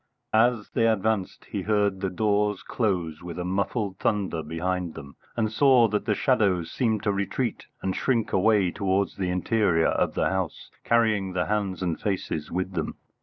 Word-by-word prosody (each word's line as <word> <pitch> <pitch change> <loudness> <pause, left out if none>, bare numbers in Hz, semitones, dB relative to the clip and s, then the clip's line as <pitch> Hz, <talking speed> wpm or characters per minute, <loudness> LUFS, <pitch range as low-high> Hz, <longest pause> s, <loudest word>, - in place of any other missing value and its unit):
As 115 -1 +3
they 115 - +2
advanced 110 -2 0
he - - -4
heard 100 -2 +1
the 95 - 0
doors 105 +1 0
close 90 -9 -1
with 85 -1 -7
a 90 - -3
muffled 100 +1 -1
thunder 95 -6 0
behind 85 +2 -3
them, 70 -3 -10 0.2
and 110 -2 +1
saw 130 -1 +5
that 105 0 -1
the 105 - +2
shadows 100 - +1
seemed 110 -4 0
to 105 - +2
retreat 100 +4 -2 0.2
and 95 -1 -1
shrink 115 -4 0
away 95 -2 +3
towards 100 0 0
the 95 -2 -1
interior 90 -2 +2
of - - 0
the - - +2
house, 95 -4 -3
carrying 110 -5 +2
the 90 0 0
hands 100 -4 -1
and 85 -3 -1
faces 90 -6 -2
with 95 +2 -2
them. 80 -4 -3
100 Hz, 170 wpm, -26 LUFS, 90-110 Hz, 0.2 s, saw